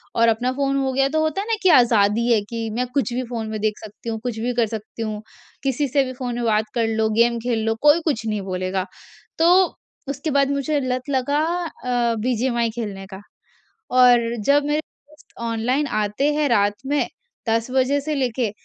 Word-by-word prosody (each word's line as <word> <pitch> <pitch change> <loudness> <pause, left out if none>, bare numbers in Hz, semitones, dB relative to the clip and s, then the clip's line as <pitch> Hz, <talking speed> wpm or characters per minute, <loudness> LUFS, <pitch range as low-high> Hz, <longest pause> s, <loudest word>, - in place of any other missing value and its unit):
और 230 0 +4
अपना 245 +3 0
फ़ोन 275 +1 0
हो 270 -1 0
गया 270 +1 +3
तो 315 - 0
होता 315 +5 0
है 415 - -6
ना 455 - +1
कि 375 - +5
आज़ादी 230 - +4
है 220 - +4
कि 230 -1 -3
मैं 250 +1 0
कुछ 270 -4 0
भी 255 +1 -1
फ़ोन 230 -2 -4
में 215 -1 -4
देख 215 -1 0
सकती 215 +2 -9
हूँ, 225 - -3
कुछ 235 -3 -3
भी 245 +2 -1
कर 235 -1 +2
सकती 220 +1 -7
हूँ, 215 -1 -4 0.4
किसी 275 +1 0
से 275 +2 +2
भी 255 - -5
फ़ोन 245 -1 -4
में 240 - -3
बात 215 -1 +2
कर 230 -2 +1
लो, 220 0 +1
गेम 235 0 +4
खेल 240 -2 0
लो, 225 - +1
कोई 300 +3 +6
कुछ 240 -8 -1
नहीं 215 -2 -1
बोलेगा। 185 +1 -2 0.5
तो 335 +2 +5 0.6
उसके 280 +2 -3
बाद 275 0 +2
मुझे 285 +1 0
लत 255 +1 -3
लगा 280 +2 +1 0.5
अ, 240 -2 +1
बीजीएमाई 235 0 0
खेलने 200 -5 -5
का, 190 - -7 0.7
और 245 -2 +4
जब 285 +1 +4
मेरे 295 +1 +1
दोस्त 300 0 -23
ऑनलाइन 250 +6 0 0.2
आते 270 +9 0
हैं 300 -1 +1
रात 205 -3 +3
में 290 +1 +1 0.4
10 230 +2 0
बजे 265 +2 +2
से 305 +2 -3
लेके, 250 -4 -1
245 Hz, 205 wpm, -22 LUFS, 225-275 Hz, 0.7 s, कोई